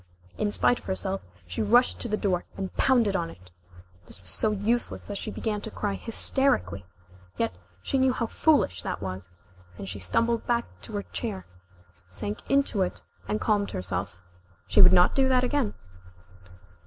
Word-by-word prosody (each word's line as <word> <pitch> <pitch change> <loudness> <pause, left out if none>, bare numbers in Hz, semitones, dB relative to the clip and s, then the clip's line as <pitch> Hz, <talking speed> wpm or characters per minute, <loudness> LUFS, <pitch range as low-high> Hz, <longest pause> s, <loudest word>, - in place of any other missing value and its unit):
In 210 -1 0
spite 245 - +2
of - - -20
herself, 95 +1 -1 0.2
she 90 +1 -4
rushed 240 +4 +3
to - - -1
the 215 -1 -1
door, 185 -4 0
and 190 -1 -4
pounded 235 -7 +3
on 170 -3 -1
it. 90 - -15 0.6
This - - -6
was 90 -1 -1
so 220 - +2
useless 215 +4 0
that 205 -1 -5
she - - -5
began 210 -2 -3
to 220 - -5
cry 205 -2 -3
hysterically. 195 - +2 0.5
Yet - - 0 0.3
she 270 - 0
knew 260 0 +4
how 245 -2 -1
foolish 225 - +2
that - - -4
was, 95 -1 -6 0.5
and - - -7
she 100 +1 -6
stumbled 230 - 0
back 235 0 +1 0.2
to 95 - -8
her 100 - -2
chair, 90 +1 -5 0.6
sank 100 +3 -5
into 275 -7 +2
it, 185 - -2 0.3
and 210 - -1
calmed 205 -2 +1
herself. 90 0 -4 0.5
She - - +4
would 180 -1 +9
not 180 -1 +5
do 265 -1 +3
that 255 -1 +3
again. 255 -3 0
200 Hz, 175 wpm, -27 LUFS, -, 0.6 s, would